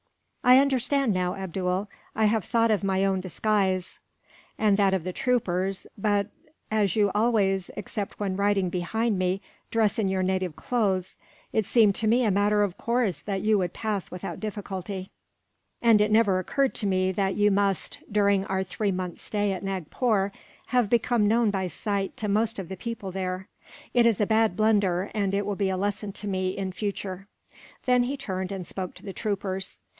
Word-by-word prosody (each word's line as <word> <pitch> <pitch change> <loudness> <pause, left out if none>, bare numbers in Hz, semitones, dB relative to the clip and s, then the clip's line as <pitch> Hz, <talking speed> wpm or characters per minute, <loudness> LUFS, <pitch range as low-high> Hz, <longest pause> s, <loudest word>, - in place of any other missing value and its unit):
'" - - -40
"I 255 - +10
understand 270 -2 +2
now, 180 0 0
Abdool. 190 +1 -2 0.3
I 220 - +3
have 215 -1 +2
thought 230 -1 +2
of 210 -1 +1
my 195 0 +1
own 190 -1 +1
disguise, 190 0 0 0.6
and 210 -2 +3
that 195 -1 +3
of 185 - -2
the 185 +1 -4
troopers; 195 -7 0
but 205 0 0 0.4
as 210 -4 +2
you 205 -2 +3
always, 205 -4 +2
except 205 0 -5
when 195 -2 -1
riding 200 -2 +1
behind 205 +4 0
me, 185 +2 0 0.3
dress 225 -2 +1
in 210 - +1
your 190 0 0
native 185 -3 -1
clothes, 195 -7 -1 0.3
it 220 -3 +1
seemed 220 -4 +5
to 225 - 0
me 240 +3 +4
a 210 - +3
matter 205 +2 +3
of 190 -3 -2
course 235 -6 0
that 195 -2 -3
you 215 -1 +3
would 180 -2 -1
pass 210 -4 -3
without 180 - -6
difficulty; 195 -3 -5 0.7
and 225 -3 +6
it 210 0 +2
never 210 -4 +4
occurred 270 +8 0
to 210 - -1
me 185 -1 +2
that 190 0 0
you 205 0 +3
must, 200 -1 0
during 200 -1 +3
our 190 -1 -1
three 200 +2 -2
months' 180 -2 -4
stay 205 -2 -1
at 185 - -6
Nagpore, 195 - 0 0.4
have 245 -3 +2
become 235 -2 +2
known 225 0 +3
by 190 -2 -1
sight 200 +1 -3
to 215 - -3
most 215 +2 +1
of 190 -3 -5
the 190 - -4
people 230 -4 -5
there. 185 0 -3 0.5
It 240 -1 +5
is 225 -4 +2
a 210 - +3
bad 220 -3 +2
blunder, 200 -4 +2
and 200 -2 0
it 200 0 0
will 205 0 -2
be 195 -1 0
a 190 - -1
lesson 205 +1 -2
to 210 - -6
me, 185 -1 -1
in 190 -1 -2
future." 195 -1 -4 0.6
Then 250 -1 +4
he 270 +3 -2
turned, 190 -7 -4
and 190 -2 -4
spoke 185 +1 -5
to - - -14
the 195 - -6
troopers. 195 -3 -3
200 Hz, 190 wpm, -26 LUFS, 190-215 Hz, 0.7 s, I